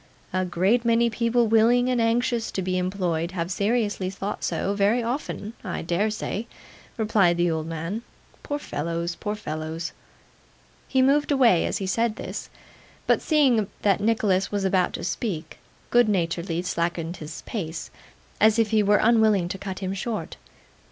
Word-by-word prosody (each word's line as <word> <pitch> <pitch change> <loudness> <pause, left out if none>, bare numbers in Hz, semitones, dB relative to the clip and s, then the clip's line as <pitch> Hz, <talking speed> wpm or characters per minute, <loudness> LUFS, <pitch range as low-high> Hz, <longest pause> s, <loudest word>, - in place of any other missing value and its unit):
'A 185 0 +1
great 190 +7 +2
many 235 0 +3
people 235 +1 +2
willing 230 +3 +4
and 250 -2 +1
anxious 230 0 +1
to 190 - -3
be 185 0 -1
employed 180 -2 -1
have 170 0 -3
seriously 205 -1 0
thought 195 +2 -5
so 200 - -1
very 205 +4 +2
often, 230 -3 -4
I 185 -5 -4
dare 175 +6 +1
say,' 215 +1 -4 0.5
replied 210 -6 +3
the 175 0 +2
old 160 -1 -2
man. 165 +7 -4 0.4
'Poor 290 - -3
fellows, 170 - -3
poor 210 +4 -4
fellows!' 160 -3 -5 1.0
He 260 -1 +3
moved 290 +3 +3
away 245 -11 +4
as - - -1
he 195 - -3
said 225 +3 0
this; - - -6 0.6
but - - +3
seeing 260 - +3 0.2
that 200 -1 +3
Nicholas 205 -3 +1
was 200 -1 -1
about 185 -1 +2
to - - -5
speak, 175 -4 -4 0.3
good 240 -2 +5
naturedly 170 -2 -1
slackened 170 -1 -2
his 155 0 -8
pace, 165 -7 -5 0.5
as 220 +1 +5
if 225 -2 +2
he 215 -1 +4
were 205 0 +4
unwilling 220 -5 +4
to 195 - -4
cut 190 -1 -5
him 190 - -2
short. 215 +3 -4
200 Hz, 160 wpm, -25 LUFS, 175-230 Hz, 1.0 s, good